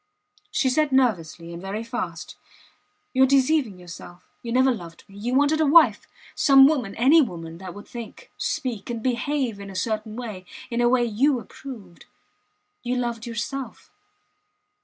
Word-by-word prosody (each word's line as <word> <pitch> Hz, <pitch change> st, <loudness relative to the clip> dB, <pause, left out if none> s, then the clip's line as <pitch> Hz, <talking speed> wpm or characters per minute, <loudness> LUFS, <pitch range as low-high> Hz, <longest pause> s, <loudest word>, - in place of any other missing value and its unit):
She 265 Hz, -, 0 dB
said 290 Hz, +3 st, +2 dB
nervously, 175 Hz, -10 st, 0 dB
and 170 Hz, -, -8 dB
very 200 Hz, +4 st, -4 dB
fast: 185 Hz, -9 st, -5 dB, 0.8 s
You 260 Hz, -, +2 dB
are -, -, +9 dB
deceiving 270 Hz, -5 st, +2 dB
yourself. 175 Hz, 0 st, -11 dB, 0.2 s
You 235 Hz, -, -6 dB
never 260 Hz, +2 st, +4 dB
loved 170 Hz, -6 st, -10 dB
me. 195 Hz, -, -17 dB
You 245 Hz, +4 st, -1 dB
wanted 290 Hz, +3 st, +3 dB
a -, -, +4 dB
wife 320 Hz, +3 st, +5 dB, 0.3 s
some 270 Hz, -1 st, +7 dB
woman 255 Hz, -10 st, -1 dB
any 275 Hz, +8 st, +6 dB
woman 165 Hz, -, -5 dB
that 185 Hz, -1 st, -8 dB
would 205 Hz, -, -11 dB
think, 235 Hz, -2 st, -10 dB
speak, 250 Hz, -10 st, -3 dB
and 230 Hz, -2 st, -4 dB
behave 255 Hz, -2 st, -1 dB
in 200 Hz, 0 st, -8 dB
a 195 Hz, -, -10 dB
certain 215 Hz, +2 st, -2 dB
way 215 Hz, -7 st, -7 dB, 0.2 s
in 235 Hz, +1 st, 0 dB
a 240 Hz, -, +4 dB
way 245 Hz, -1 st, +3 dB
you 250 Hz, +5 st, +2 dB
approved. 215 Hz, -6 st, -11 dB, 0.7 s
You 250 Hz, +1 st, -2 dB
loved 235 Hz, -1 st, -3 dB
yourself. 245 Hz, +4 st, -5 dB
235 Hz, 160 wpm, -24 LUFS, 195-265 Hz, 0.8 s, are